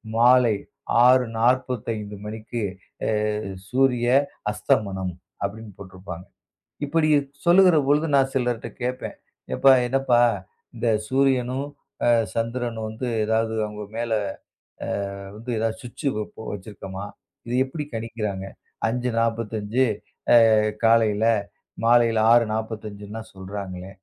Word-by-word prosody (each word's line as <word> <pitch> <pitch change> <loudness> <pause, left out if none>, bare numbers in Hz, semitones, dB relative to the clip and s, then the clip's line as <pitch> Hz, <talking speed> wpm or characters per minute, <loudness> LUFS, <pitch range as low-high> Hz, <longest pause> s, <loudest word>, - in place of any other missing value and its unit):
மாலை 120 0 +5 0.5
6:45 115 -3 +1
மணிக்கு 110 +2 -5 0.5
அ - - +1 0.6
சூரிய 125 -2 +2 0.4
அஸ்தமனம் 95 -3 0 0.3
அப்படின்னு 105 +1 -5
போட்டு 95 -1 -11
இருப்பாங்க. 90 -1 -8 0.6
இப்படி 155 +1 +2 0.4
சொல்லுகிற 180 -1 +6
பொழுது 150 +3 +3
நான் 135 0 +3
சிலர்ட்ட 120 -2 -1
கேப்பேன். 125 +1 -3 0.4
எப்பா 135 - +7
என்னப்பா 130 -2 +2 0.6
இந்தச் 110 -2 0
சூரியனும் 130 0 +1 0.4
அ - - +5 0.2
சந்திரனும் 115 -1 -2
வந்து 110 +4 -5 0.2
ஏதாவது 110 +1 +1
அவங்க 105 0 -7
மேல, 120 0 -2 1.1
அ, - - -9 0.2
வந்து, 115 +3 -9
ஏதாவது 110 0 -1
சுவிட்ச் 125 +4 -5
வப்ப 110 +1 -6
வச்சிருக்கமா? 100 -1 -7 0.4
இதை 120 - -1
எப்படி 150 +3 -5
கணிக்கிறாங்க? 105 -4 -4 0.4
5:45 115 -1 0 0.7
அ - - +5 0.3
காலையில 115 -1 +4 0.6
மாலையில 115 -1 +4
6:45ன்னு 110 -2 0
சொல்றாங்களே. 95 -1 -7
115 Hz, 100 wpm, -24 LUFS, 105-125 Hz, 1.1 s, எப்பா